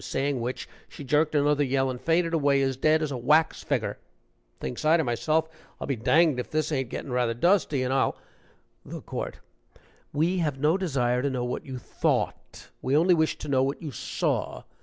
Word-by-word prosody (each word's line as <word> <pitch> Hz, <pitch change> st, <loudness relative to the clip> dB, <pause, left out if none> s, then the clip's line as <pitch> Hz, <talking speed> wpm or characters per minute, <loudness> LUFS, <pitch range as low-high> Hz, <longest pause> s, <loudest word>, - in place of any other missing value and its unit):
saying 135 Hz, -2 st, -1 dB
which, 125 Hz, +2 st, -4 dB, 0.2 s
she -, -, -10 dB
jerked 150 Hz, +3 st, +1 dB
another 145 Hz, 0 st, +3 dB
yell 135 Hz, -1 st, +1 dB
and 125 Hz, -, -7 dB
fainted 165 Hz, 0 st, +1 dB
away 145 Hz, -3 st, +3 dB
as 135 Hz, -1 st, 0 dB
dead 155 Hz, +4 st, +2 dB
as 150 Hz, -, -2 dB
a 130 Hz, -, -3 dB
wax 150 Hz, +6 st, +2 dB
figger. -, -, -2 dB, 0.6 s
Thinks 125 Hz, -, -5 dB
I 155 Hz, +2 st, +5 dB
to 160 Hz, -, +1 dB
myself, 155 Hz, +6 st, 0 dB, 0.3 s
I'll -, -, -4 dB
be 135 Hz, -, -1 dB
danged 145 Hz, +4 st, +3 dB
if 125 Hz, -, -4 dB
this 155 Hz, 0 st, -1 dB
ain't 135 Hz, -4 st, -1 dB
gettin' 135 Hz, -, -6 dB
rather 120 Hz, -2 st, 0 dB
dusty, 155 Hz, -, +2 dB
and 130 Hz, +1 st, -1 dB
I'll 135 Hz, -, +1 dB, 0.3 s
" -, -, -39 dB
THE -, -, -8 dB
COURT. -, -, -6 dB, 0.7 s
"We 170 Hz, +5 st, +1 dB
have 150 Hz, -5 st, -1 dB
no 150 Hz, +5 st, +2 dB
desire 130 Hz, -10 st, 0 dB
to 140 Hz, -, 0 dB
know 125 Hz, -2 st, -2 dB
what 125 Hz, -, -4 dB
you 130 Hz, -1 st, -5 dB
thought; -, -, -2 dB
we 135 Hz, +3 st, +2 dB
only 175 Hz, +3 st, +5 dB
wish 160 Hz, -2 st, +1 dB
to -, -, -8 dB
know 135 Hz, -2 st, +2 dB
what 135 Hz, +2 st, -1 dB
you 155 Hz, -3 st, -6 dB
saw. 115 Hz, -, -2 dB
145 Hz, 200 wpm, -26 LUFS, 130-155 Hz, 0.7 s, I